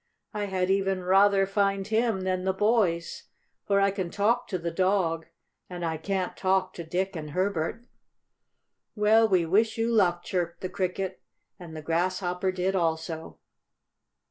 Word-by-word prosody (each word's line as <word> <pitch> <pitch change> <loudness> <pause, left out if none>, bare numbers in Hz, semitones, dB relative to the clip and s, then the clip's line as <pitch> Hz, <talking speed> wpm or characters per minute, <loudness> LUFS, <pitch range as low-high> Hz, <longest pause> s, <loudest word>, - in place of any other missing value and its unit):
I 210 -1 -2
had 190 -1 0
even 195 -1 0
rather 195 +1 +4
find 195 0 0
him 220 -1 +1
than 185 -1 -1
the 190 0 +1
boys, 190 -5 0 0.4
for 200 0 +3
I 200 0 +3
can 190 -3 -3
talk 230 +7 +1
to 185 - -2
the 170 -1 -4
dog, 175 -3 0 0.4
and 175 -1 -5
I 160 -1 -2
can't 185 +2 -2
talk 190 0 +1
to 170 - -7
Dick 185 +4 -2
and 155 -2 -5
Herbert." 185 +5 -2 1.1
"Well, 220 +1 +4
we 180 -4 +3
wish 215 +8 +2
you 230 +1 0
luck," 175 -6 +2
chirped 175 -2 -3
the 185 - -3
Cricket, 185 0 -3 0.4
and 170 -3 -10
the 155 - -7
Grasshopper 180 +2 0
did 185 +1 -1
also. 160 -2 -2
185 Hz, 155 wpm, -27 LUFS, 175-200 Hz, 1.1 s, rather